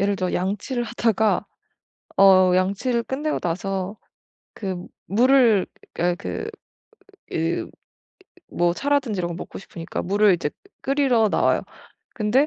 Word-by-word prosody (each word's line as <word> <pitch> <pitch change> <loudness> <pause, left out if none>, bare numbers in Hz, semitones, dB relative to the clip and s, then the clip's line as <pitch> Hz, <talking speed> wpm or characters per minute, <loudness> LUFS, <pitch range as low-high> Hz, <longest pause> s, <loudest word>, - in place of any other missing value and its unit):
예를 200 0 +1
들어 185 -1 -2
양치를 210 +7 -1
하다가 225 -2 +1 0.7
어 185 -2 +7
양치를 200 +6 +1
끝내고 295 +5 -2
나서 190 +3 -3 0.6
그 190 -3 -4 0.3
물을 235 -2 +4 0.3
아 175 +1 +2
그 90 - -5 0.8
그 165 +1 -1 0.8
뭐 175 0 +2
차라든지 275 -4 0
이런 175 - -1
걸 170 - -5
먹고 180 - -8
싶으니까 170 -3 -6
물을 205 +1 +4
이제 155 -4 -2 0.3
끓이러 265 -5 +3
나와요. - - +2 0.5
근데 235 +6 +2
200 Hz, 245 characters per minute, -23 LUFS, 185-240 Hz, 0.8 s, 어